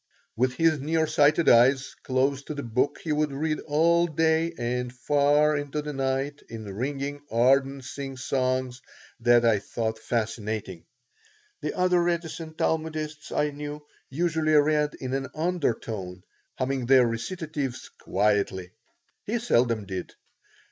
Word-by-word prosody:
With 125 Hz, +2 st, +1 dB
his 165 Hz, -2 st, +3 dB
near 160 Hz, +3 st, +1 dB
sighted 150 Hz, +2 st, +3 dB
eyes 130 Hz, +3 st, +5 dB
close 130 Hz, +1 st, 0 dB
to 150 Hz, -, -5 dB
the 140 Hz, -, -4 dB
book 120 Hz, +4 st, 0 dB
he 160 Hz, -, -2 dB
would 150 Hz, 0 st, +1 dB
read 155 Hz, +3 st, -1 dB
all 170 Hz, +3 st, +3 dB
day 160 Hz, +1 st, +1 dB
and 125 Hz, +1 st, -2 dB
far 145 Hz, +3 st, +3 dB
into 145 Hz, +1 st, -3 dB
the 150 Hz, 0 st, -5 dB
night 135 Hz, +2 st, -2 dB
in 110 Hz, -1 st, -7 dB
ringing, 140 Hz, +5 st, -3 dB
ardent 135 Hz, +3 st, +2 dB
singsongs 130 Hz, -1 st, -2 dB, 0.4 s
that 120 Hz, 0 st, +4 dB
I 110 Hz, -3 st, +4 dB
thought 110 Hz, +1 st, -3 dB
fascinating. 110 Hz, -5 st, -3 dB, 0.8 s
The -, -, -3 dB
other 180 Hz, -1 st, +3 dB
reticent 165 Hz, -2 st, -3 dB
Talmudists 155 Hz, -1 st, -2 dB
I 150 Hz, 0 st, +1 dB
knew 150 Hz, +1 st, -7 dB, 0.2 s
usually 160 Hz, +1 st, 0 dB
read 150 Hz, 0 st, +3 dB
in 130 Hz, 0 st, -5 dB
an 135 Hz, 0 st, -1 dB
undertone, 115 Hz, -, -2 dB, 0.3 s
humming 130 Hz, -1 st, -2 dB
their 130 Hz, -1 st, +6 dB
recitatives 135 Hz, +2 st, -4 dB
quietly. 100 Hz, -2 st, 0 dB, 0.6 s
He 225 Hz, +4 st, 0 dB
seldom 120 Hz, -, +1 dB
did. 95 Hz, -2 st, -6 dB
140 Hz, 130 wpm, -26 LUFS, 120-155 Hz, 0.8 s, their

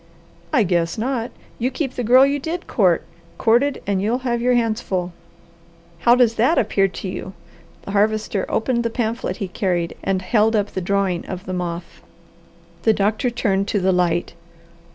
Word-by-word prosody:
"I 265 Hz, -7 st, +4 dB
guess 170 Hz, -2 st, 0 dB
not! 240 Hz, +1 st, -2 dB, 0.3 s
You 245 Hz, +2 st, +1 dB
keep 270 Hz, -1 st, -3 dB
the 245 Hz, -, -3 dB
girl 255 Hz, +4 st, +6 dB
you 285 Hz, +1 st, 0 dB
did 330 Hz, +5 st, -4 dB
court, 185 Hz, -8 st, +2 dB, 0.3 s
courted, 250 Hz, +5 st, +2 dB
and 195 Hz, -1 st, 0 dB
you'll 220 Hz, +5 st, +1 dB
have 240 Hz, -1 st, 0 dB
your 250 Hz, +1 st, +3 dB
hands 230 Hz, -1 st, +1 dB
full. 180 Hz, -4 st, -3 dB, 0.9 s
How 240 Hz, +6 st, +5 dB
does 245 Hz, -3 st, +4 dB
that 255 Hz, +9 st, +3 dB
appear 195 Hz, -3 st, +2 dB
to 195 Hz, -, -7 dB
you?" 185 Hz, +1 st, -6 dB, 0.5 s
The -, -, -7 dB
Harvester 210 Hz, -1 st, 0 dB
opened 235 Hz, +1 st, 0 dB
the 230 Hz, -, 0 dB
pamphlet 230 Hz, 0 st, -2 dB
he 200 Hz, -, -3 dB
carried 175 Hz, -2 st, -1 dB
and 190 Hz, -1 st, 0 dB
held 220 Hz, +3 st, +2 dB
up 205 Hz, -1 st, 0 dB
the 190 Hz, -, -3 dB
drawing 190 Hz, -1 st, 0 dB
of 185 Hz, -1 st, -6 dB
the 185 Hz, -, -4 dB
moth. 175 Hz, -1 st, -5 dB, 0.8 s
The 220 Hz, -, +4 dB
doctor 215 Hz, +5 st, +1 dB
turned 200 Hz, -5 st, 0 dB
to 205 Hz, -, 0 dB
the 190 Hz, 0 st, +2 dB
light. 175 Hz, -1 st, 0 dB
215 Hz, 175 wpm, -21 LUFS, 185-240 Hz, 0.9 s, girl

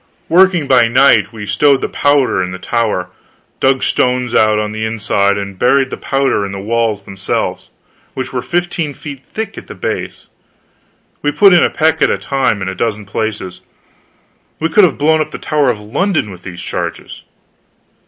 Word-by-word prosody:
Working 180 Hz, -3 st, +4 dB
by 125 Hz, -3 st, +5 dB
night, 120 Hz, -3 st, +4 dB
we 110 Hz, -3 st, -8 dB
stowed 135 Hz, +8 st, +3 dB
the -, -, -1 dB
powder 145 Hz, -8 st, +2 dB
in 90 Hz, -, -4 dB
the 90 Hz, -, -6 dB
tower 105 Hz, -4 st, -2 dB, 0.5 s
dug 130 Hz, 0 st, +2 dB
stones 125 Hz, -1 st, 0 dB
out, 110 Hz, 0 st, +3 dB
on 105 Hz, 0 st, -2 dB
the 110 Hz, 0 st, -4 dB
inside, 105 Hz, -2 st, 0 dB
and 100 Hz, -2 st, -6 dB
buried 135 Hz, +1 st, +2 dB
the -, -, -3 dB
powder 135 Hz, -6 st, 0 dB
in 100 Hz, -, -4 dB
the 100 Hz, -, -6 dB
walls 110 Hz, 0 st, -1 dB
themselves, 95 Hz, -1 st, -3 dB, 0.5 s
which 130 Hz, 0 st, -5 dB
were 125 Hz, -, -1 dB
fifteen 170 Hz, 0 st, -2 dB
feet 140 Hz, -2 st, -9 dB
thick 220 Hz, -1 st, -4 dB
at -, -, -16 dB
the -, -, -9 dB
base. -, -, -4 dB, 1.0 s
We 145 Hz, -, +1 dB
put 200 Hz, +4 st, +5 dB
in 175 Hz, -, +6 dB
a -, -, +3 dB
peck 160 Hz, 0 st, +1 dB
at -, -, +4 dB
a -, -, +1 dB
time, 130 Hz, -8 st, -1 dB
in -, -, -4 dB
a 95 Hz, -, -3 dB
dozen 105 Hz, +1 st, -2 dB
places. 100 Hz, -3 st, -4 dB, 1.0 s
We 165 Hz, -, 0 dB
could 195 Hz, +4 st, +5 dB
have 165 Hz, -, -1 dB
blown 155 Hz, +2 st, +3 dB
up -, -, -2 dB
the -, -, -7 dB
Tower 150 Hz, -3 st, +1 dB
of 115 Hz, -4 st, -1 dB
London 115 Hz, -, -1 dB
with 90 Hz, -1 st, -11 dB
these 90 Hz, -2 st, -8 dB
charges. -, -, -5 dB
120 Hz, 185 wpm, -15 LUFS, 105-145 Hz, 1.0 s, in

